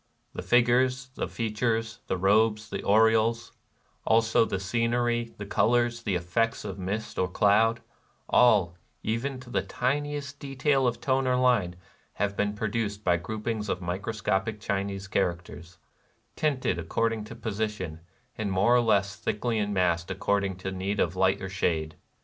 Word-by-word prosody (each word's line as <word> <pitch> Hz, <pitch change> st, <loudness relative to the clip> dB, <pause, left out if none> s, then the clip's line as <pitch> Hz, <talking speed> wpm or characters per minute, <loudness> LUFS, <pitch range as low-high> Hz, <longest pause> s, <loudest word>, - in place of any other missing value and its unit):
The -, -, -5 dB
figures, 125 Hz, +2 st, +2 dB
the -, -, -3 dB
fea 115 Hz, -2 st, -3 dB
tures, 115 Hz, 0 st, -1 dB
the 95 Hz, -, -1 dB
robes, 105 Hz, +3 st, +2 dB
the -, -, -3 dB
aureoles, 115 Hz, +2 st, +3 dB, 0.3 s
— -, -, -41 dB, 0.2 s
also 110 Hz, 0 st, +4 dB
the 100 Hz, -, -2 dB
scen 115 Hz, +5 st, 0 dB
ery, 120 Hz, -1 st, -1 dB
the 105 Hz, -, -6 dB
colors, 120 Hz, +3 st, +1 dB
the 105 Hz, -5 st, -1 dB
effects 100 Hz, +8 st, -1 dB
of 100 Hz, -1 st, -6 dB
mist 100 Hz, +4 st, -4 dB
or 90 Hz, -, +2 dB
cloud, 110 Hz, +5 st, +3 dB, 0.3 s
— -, -, -38 dB
all, 105 Hz, -8 st, +4 dB, 0.3 s
even 125 Hz, +5 st, -2 dB
to 125 Hz, -1 st, -12 dB
the -, -, +1 dB
tiniest 145 Hz, +2 st, -2 dB
detail 135 Hz, -1 st, +1 dB
of 120 Hz, -, -2 dB
tone 130 Hz, -1 st, +1 dB
or 125 Hz, -, +3 dB
line, 120 Hz, -9 st, +2 dB, 0.4 s
have 100 Hz, 0 st, -1 dB
been 105 Hz, +1 st, -1 dB
produced 105 Hz, -1 st, -2 dB
by 85 Hz, -3 st, +3 dB
groupings 105 Hz, +3 st, -4 dB
of 90 Hz, -, -1 dB
microscopic 95 Hz, +3 st, -2 dB
Chinese 100 Hz, -1 st, -3 dB
characters, 85 Hz, -2 st, -3 dB, 0.3 s
— -, -, -42 dB
tinted 140 Hz, -, 0 dB
according 110 Hz, +6 st, -1 dB
to -, -, -9 dB
posi 110 Hz, 0 st, -2 dB
tion, 90 Hz, -7 st, -7 dB, 0.4 s
and 105 Hz, -2 st, -3 dB
more 95 Hz, +6 st, +3 dB
or 125 Hz, -, +5 dB
less 100 Hz, -3 st, +2 dB
thickly 110 Hz, +1 st, -1 dB
massed 90 Hz, -3 st, 0 dB
accord 100 Hz, +2 st, 0 dB
ing 95 Hz, -1 st, -2 dB
to 95 Hz, +1 st, -5 dB
need 95 Hz, +2 st, -3 dB
of 85 Hz, +1 st, +1 dB
light 95 Hz, +1 st, +2 dB
or 95 Hz, -, -4 dB
shade. 80 Hz, -5 st, -1 dB
110 Hz, 165 wpm, -27 LUFS, 95-120 Hz, 0.4 s, or